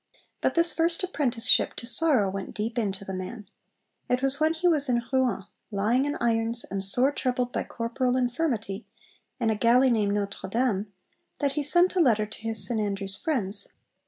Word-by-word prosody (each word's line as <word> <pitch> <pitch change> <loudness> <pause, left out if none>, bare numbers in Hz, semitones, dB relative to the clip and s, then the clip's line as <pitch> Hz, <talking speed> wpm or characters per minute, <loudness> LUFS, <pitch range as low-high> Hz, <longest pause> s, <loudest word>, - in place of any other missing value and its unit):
But - - 0
this 335 0 +4
first 335 +2 +2
apprenticeship 250 -10 +2
to - - -7
sorrow 255 -3 +2
went 190 0 -6
deep 225 +3 -2
into 200 -3 -3
the 190 - -6
man. 190 +3 -7 0.6
It 250 +1 0
was 270 0 +5
when 315 +1 +2
he 350 +2 0
was 300 -5 +4
'in 240 -1 +1
Rouen, 255 -7 +1 0.3
lying 225 +6 +1
in 290 - -2
irons, 230 0 0
and 195 -1 -4
sore 245 +8 +2
troubled 250 -3 -2
by - - -2
corporal 245 +2 -2
infirmity, 245 -5 -2 0.5
in 230 -2 +1
a - - 0
galley 245 +4 +4
named 210 -3 +1
Notre 200 -2 -4
Dame,' 215 -3 -1 0.5
that 280 -2 0
he 300 - -1
sent 350 +6 +3
a - - +2
letter 225 -9 +3
to 215 - -10
his 220 -3 -1
St 225 +2 -1
Andrews 195 -2 -2
friends. 225 - -2
235 Hz, 185 wpm, -26 LUFS, 210-270 Hz, 0.6 s, was